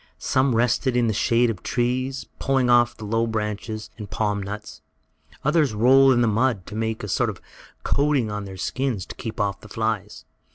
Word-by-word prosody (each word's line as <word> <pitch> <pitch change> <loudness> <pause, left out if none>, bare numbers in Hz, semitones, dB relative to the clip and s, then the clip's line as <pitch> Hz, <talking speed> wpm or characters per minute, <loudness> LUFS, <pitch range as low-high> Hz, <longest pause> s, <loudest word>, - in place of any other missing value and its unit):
Some 130 -2 +1
rested 120 +2 +1
in 120 - +3
the 110 - +1
shade 115 +3 +2
of 100 -5 -8
trees, 130 +2 -1
pulling 130 -2 +2
off 120 -1 +4
the 110 - -8
low 115 +2 0
branches 110 0 -4
and 105 - -6
the - - -32
palm 105 -2 -1
nuts. 100 +2 -7 0.6
Others 150 -6 +2
rolled 130 +4 +6
in 120 - +2
the 120 - +3
mud, 115 -2 +1
to - - -9
make 110 0 -2
a - - -4
sort - - +1
of - - -7 0.4
coating 140 -6 +1
over 105 0 -4
their 95 -1 -8
skins, 125 -1 -2
to - - -9
keep 115 -2 -6
off 100 -2 -1
the 105 - -13
flies. 110 -2 -3
115 Hz, 200 wpm, -23 LUFS, 105-130 Hz, 0.6 s, rolled